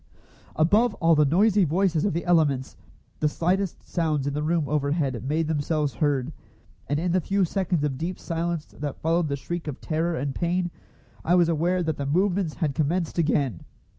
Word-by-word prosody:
Above 205 +10 +3
all 165 -1 +3
the 150 -1 +4
noisy 200 +7 +4
voices 170 0 +1
of 205 - +1
the 170 - -2
elements, 150 -7 +2 0.4
the 155 - +2
slightest 180 +4 -1
sounds 155 -5 0
in 145 - -1
the 150 - -2
room 160 -1 0
overhead 140 -3 -1
made 155 +4 0
themselves 150 -2 0
heard, 145 +2 0 0.6
and 145 +1 +1
in 175 +1 0
the 185 +1 +2
few 195 +3 +1
seconds 175 -3 -1
of 135 -3 -2
deep 175 +3 -3
silence 165 -1 -3
that 145 -2 -4
followed 165 +1 +1
the 140 - -1
shriek 170 +4 -5
of 145 - -5
terror 165 +2 -1
and 140 0 -2
pain 175 +2 -1 0.5
I 175 - +3
was 175 -2 +4
aware 175 +3 +1
that 160 -1 -2
the 140 - -3
movements 180 +1 +1
had 155 -5 -1
commenced 165 +4 -1
again. 140 - 0
160 Hz, 185 wpm, -25 LUFS, 145-175 Hz, 0.6 s, the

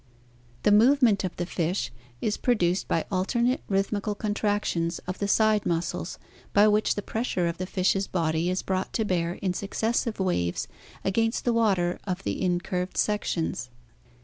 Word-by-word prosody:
The 210 - +4
move 255 +7 +5
ment 205 -5 +4
of 185 - -3
the 175 - -2
fish 170 - -1 0.3
is 210 -1 0
produced 185 -7 +1
by 165 - 0
alternate 235 +7 +1
rhythmical 200 +1 0
contractions 205 -5 -1
of 185 +1 -5
the 200 - 0
side 215 0 +3
muscles, 170 +1 -2 0.4
by 205 +1 +6
whkh 210 0 +3
the 205 - -3
pressure 220 -6 -1
of 170 0 -2
the 185 - -3
fish's 195 +1 +1
body 165 -1 0
is 185 +1 -1
brought 190 0 -2
to 220 - 0
bear 175 -3 0
in 185 -2 -2
successive 220 +3 -1
waves 90 - 0 0.4
against 225 +4 +1
the 240 - +3
water 195 -6 +2
of 190 0 -3
the - - -2
in 180 -2 +2
curved 180 0 -3
sections. 175 -10 -1
195 Hz, 165 wpm, -27 LUFS, 175-215 Hz, 0.4 s, by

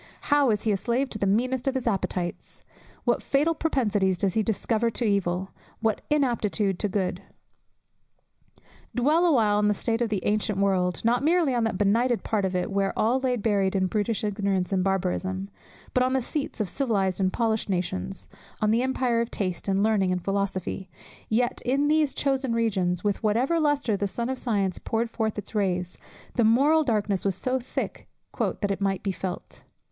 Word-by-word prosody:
How 290 -3 +4
is 210 -2 0
he 220 - +1
a 200 - +2
slave 245 +6 -1
to 215 - -5
the 200 - +1
meanest 250 +6 0
of 270 - +1
his 260 - -2
appetites! 185 -5 -3 0.4
What - - +1
fatal 295 +4 +2
propensities 210 - +1
does 190 0 0
he 220 - +2
discover 220 +2 0
to 235 +1 -1
evil! 190 -2 0 0.3
What 220 -2 0
inaptitude 225 - +1
to 210 - 0
good! 190 -1 -1 1.7
Dwell 305 +8 +3
awhile 220 -9 +3
on 210 - +3
the 210 - +2
state 230 +3 -1
of 235 - +1
the 205 -4 -2
ancient 210 -1 0
world; 185 -2 +1
not 240 +3 +2
merely 325 -3 +3
on 235 -2 +1
that 225 - -1
benighted 230 +4 +2
part 210 -3 0
of 185 -1 -2
it 180 +4 -1
where 195 0 0
all 235 +4 +2
lay 260 -1 0
buried 200 -4 +1
in 190 -1 +2
brutish 210 +3 -1
ignorance 200 -3 -1
and 185 -1 +2
barbarism, 190 0 -1 0.4
but 255 - +3
on 255 +1 +2
the 265 - +3
seats 295 0 -4
of 210 - 0
civilized 200 -7 0
and 190 -1 +2
polished 220 -1 0
nations, 180 - -3 0.3
on 215 0 +2
the 230 +2 +3
empire 255 -2 +1
of 235 - -2
taste, 185 -3 -3
and 195 0 +2
learning, 205 -4 +2
and 180 -1 -2
philosophy: 195 -1 -2 0.4
yet 240 +3 +1
in 275 +4 +1
these 305 -2 +2
chosen 270 -3 0
regions, 190 -6 0
with 205 -1 0
whatever 240 +10 +2
lustre 290 -7 +1
the 200 0 -1
sun 235 +5 -3
of 260 -1 -2
science 200 -6 -1
poured 230 +1 -2
forth 220 -2 -2
its 210 - -6
rays, 180 -4 -1 0.4
the 240 - +4
moral 280 +8 +4
darkness 210 - 0
was 195 -2 +1
so 255 +7 -1
thick 250 - -5 0.3
"that 205 -2 0
it 195 - -3
might 195 -1 0
be 195 - 0
felt." 185 0 -6
215 Hz, 190 wpm, -26 LUFS, 195-245 Hz, 1.7 s, How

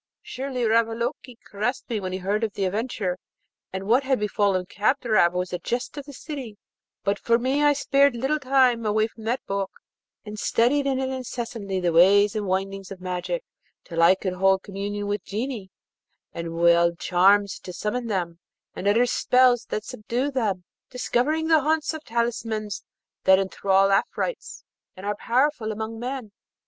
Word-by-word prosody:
Surely 260 -1 -4
Ravaloke 230 +3 0
caressed 215 +6 -3
me 230 -4 -2
when 185 -2 -4
he 185 - -2
heard 200 +4 -1
of 215 -3 -1
the 195 - -1
adventure, 195 -2 -2 0.5
and 190 0 -4
what 235 +7 +3
had 265 -2 +1
befallen 200 -3 +1
Kadrab 215 -2 +2
was 180 0 -2
the 180 - -3
jest 245 +3 -3
of 285 -2 -7
the 285 - -10
city; 260 -7 -7 0.5
but 200 0 0
for 230 0 +3
me 260 +4 0
I 290 0 +5
spared 275 -1 +3
little 270 +6 0
time 255 -3 +3
away 215 0 +2
from 220 0 -11
that 240 +3 -1
book, 195 -1 -2 0.6
and 210 0 -7
studied 275 +7 +2
in 270 -1 +1
it 265 0 -1
incessantly 235 -6 -4
the 175 -2 0
ways 200 +5 +5
and 210 -2 -2
windings 195 +1 -2
of 195 - -8
magic, 185 - -3 0.4
till 165 -2 -2
I 170 +3 +7
could 190 -1 -3
hold 190 +1 +2
communication 205 +1 -4
with 205 -1 -2
Genii, 220 -2 -4 0.6
and 170 0 -5
wield 170 0 +4
charms 195 +3 +3
to 180 - -8
summon 230 +6 -3
them, 175 -5 -2 0.4
and 195 - -3
utter 225 +4 +4
spells 250 -1 +3
that 215 - -3
subdue 245 +6 -3
them, 210 -9 -1 0.3
discovering 255 +5 0
the 320 -2 +5
haunts 315 +2 0
of 315 -1 -7
talismans 225 -4 -2 0.4
that 190 0 +7
enthral 195 0 +2
Afrites 435 - -1 0.3
and 190 - -8
are 205 0 -1
powerful 245 0 +1
among 220 +1 -5
men. 250 -3 -5
215 Hz, 170 wpm, -25 LUFS, 195-250 Hz, 0.6 s, I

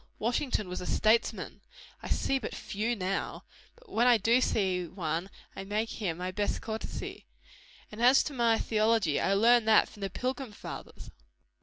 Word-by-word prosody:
Washington 235 -2 -1
was 180 0 -5
a - - -6
statesman! 220 +2 +1 0.4
I - - -7
see 270 - +1
but 230 - -6
few 220 +4 -2
now; 195 -1 -3 0.3
but - - -21
when 245 - +2
I 245 -2 +6
do 230 +4 +3
see 185 -7 0
one, 170 +1 -3 0.3
I 195 - -6
make 210 +3 -2
him 180 -7 -3
my 180 +1 -3
best 205 +2 -1
courtesy. 220 0 -6 0.6
And 215 +2 -7
as 250 +3 +6
to 295 - -5
my 235 -3 +3
theology, 215 -8 +1
I 195 - +2
learned 230 +2 +4
that 220 - +6
from 205 - -15
the 195 - -2
pilgrim 255 +2 -4
fathers." - - -9
215 Hz, 170 wpm, -30 LUFS, 195-235 Hz, 0.6 s, I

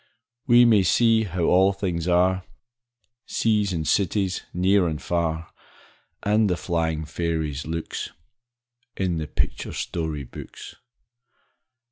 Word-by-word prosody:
We 120 -1 +7
may 110 -4 +5
see 115 +3 +3
how 90 -2 -3
all 95 +3 +4
things 90 -4 -3
are, 90 +1 +2 0.8
Seas 105 -3 +1
and 80 -3 -2
cities, 95 -1 +1
near 95 +1 +3
and 80 -2 -3
far, 85 -1 -2 0.7
And 105 0 +3
the 90 - 0
flying 80 -2 -1
fairies' 80 -3 -3
looks, 80 0 -4 0.9
In 90 -3 0
the 80 - -4
picture - - -3
story 80 -4 -3
books. 60 - -10
90 Hz, 115 wpm, -24 LUFS, 80-100 Hz, 0.9 s, We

